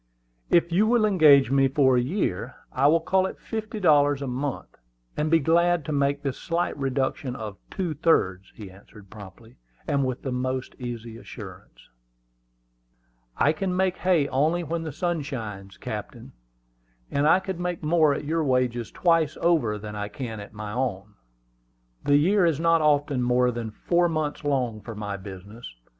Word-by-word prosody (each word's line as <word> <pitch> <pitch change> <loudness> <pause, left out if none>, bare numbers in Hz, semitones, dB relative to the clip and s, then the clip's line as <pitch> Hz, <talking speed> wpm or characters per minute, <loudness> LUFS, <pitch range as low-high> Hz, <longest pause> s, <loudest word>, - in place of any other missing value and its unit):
"If 170 0 +3
you 200 +6 +3
will 235 -1 +3
engage 155 -10 +5
me 135 0 +4
for 135 -1 +3
a 125 - +3
year, 125 - -2 0.2
I 135 +2 +3
will 165 +2 +4
call 190 +3 +2
it - - -8
fifty 215 -1 -5
dollars 145 -5 +3
a - - -4
month, 130 +2 -4 0.4
and 150 +1 -1
be 165 - +5
glad 170 +1 +2
to - - -4
make 140 0 0
this 135 -2 -3
slight 170 0 -1
reduction 135 -1 -2
of 105 -4 -7
two 180 -5 -3
thirds," 100 - +1
he 100 -4 -10
answered 100 +1 -17
promptly, 105 +2 -13 0.3
and 140 -2 +1
with 130 -1 -3
the 130 - -3
most 130 +1 -3
easy 120 -2 -6
assurance. - - -12 1.5
"I 150 - +3
can 180 +3 -2
make 185 -1 +1
hay 175 -6 +2
only 155 +6 +1
when 165 +1 -3
the 160 -1 -5
sun 175 +2 -2
shines, 105 -9 -7
captain; - - -7 0.8
and 140 +1 +2
I 180 - +6
could 190 -2 -5
make 180 -1 -3
more 155 -1 +3
at 145 - -5
your 160 +2 0
wages 125 -4 0
twice 165 -4 +1
over 155 -12 +2
than 105 0 -8
I 105 0 -3
can 115 -1 -6
at 100 - -10
my 105 0 -7
own. 105 -4 -3 0.9
The 145 0 +5
year 190 +6 +3
is 165 -4 +2
not 165 0 +3
often 145 -3 +2
more 125 0 +2
than 115 -2 -5
four 175 +10 +1
months 155 -2 -2
long 125 -7 -1
for 110 +2 -8
my 105 -1 -4
business. 100 - -10
140 Hz, 175 wpm, -25 LUFS, 120-165 Hz, 1.5 s, I